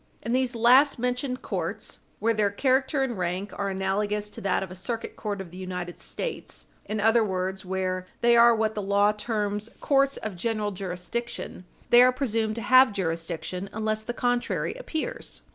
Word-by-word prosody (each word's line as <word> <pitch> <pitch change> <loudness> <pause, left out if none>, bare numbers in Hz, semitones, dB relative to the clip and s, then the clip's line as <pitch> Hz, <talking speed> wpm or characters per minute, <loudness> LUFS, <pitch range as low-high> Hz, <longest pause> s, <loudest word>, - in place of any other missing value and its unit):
In 230 - -3
these 255 -1 +1
last 255 +6 +5
mentioned 250 +1 -2
courts, - - -4 0.2
where 230 +1 +2
their 210 -2 +2
character 265 +5 +1
and 240 -7 -3
rank 180 +3 -2
are 200 -1 -2
analogous 205 +2 -1
to - - -9
that 195 0 +1
of 190 - -8
a - - -7
Circuit 230 +5 -5
Court 205 -2 -4
of 185 -3 -7
the 180 - -10
United 180 -2 -5
States - - -5 0.2
in 215 0 -3
other 225 +2 +4
words, 190 -1 -2
where 185 0 -2
they 235 0 +5
are 235 0 +7
what 220 -1 0
the 210 - -3
law 200 +1 +3
terms 210 0 -2
courts 275 -1 +2
of 215 -3 -5
general 210 +2 -1
jurisdiction 185 +2 -5 0.3
they 240 - +9
are 255 0 +7
presumed 225 -4 -1
to 230 - -4
have 255 0 +7
jurisdiction 175 +1 -3
unless 215 0 -1
the 220 - -4
contrary 245 0 0
appears. - - -5
215 Hz, 180 wpm, -26 LUFS, 190-240 Hz, 0.3 s, they